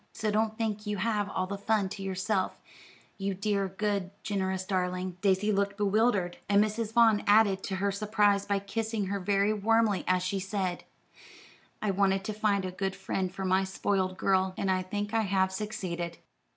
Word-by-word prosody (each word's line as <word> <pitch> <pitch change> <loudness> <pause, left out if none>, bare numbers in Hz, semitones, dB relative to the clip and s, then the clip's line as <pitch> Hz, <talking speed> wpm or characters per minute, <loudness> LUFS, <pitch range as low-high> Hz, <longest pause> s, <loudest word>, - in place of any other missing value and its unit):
So 215 -1 -1
don't 220 +1 0
think 215 -2 -2
you 210 0 -1
have 210 0 0
all 185 - -1
the 200 +1 -5
fun 210 -1 +1
to 200 0 -7
yourself, 190 +1 -1 0.6
you 195 0 -1
dear, 200 0 0
good, 200 -1 -2
generous 190 -2 -1
darling." 185 -1 -1
Daisy 200 +1 +2
looked 200 0 0
bewildered, 205 -3 +1
and 200 0 +5
Mrs. 215 +1 -2
Vaughn 225 -3 +5
added 205 -2 +5
to 195 - -3
her 200 +1 0
surprise 205 0 +2
by 200 -1 0
kissing 215 +1 -2
her 200 - -1
very 200 +2 +2
warmly 215 -1 +2
as 180 0 +2
she 195 +2 -1
said: 190 -2 -3 1.0
"I 210 - +2
wanted 195 0 +2
to 215 - -3
find 205 -2 +1
a 185 - -3
good 190 +1 -3
friend 190 -1 -2
for 190 0 -5
my 190 +1 +3
spoiled 190 -1 -1
girl, 190 -1 +1
and 195 - 0
I 185 0 +1
think 205 +3 -4
I 225 - +3
have 190 -2 +1
succeeded." 180 -5 -4
200 Hz, 180 wpm, -29 LUFS, 190-210 Hz, 1.0 s, and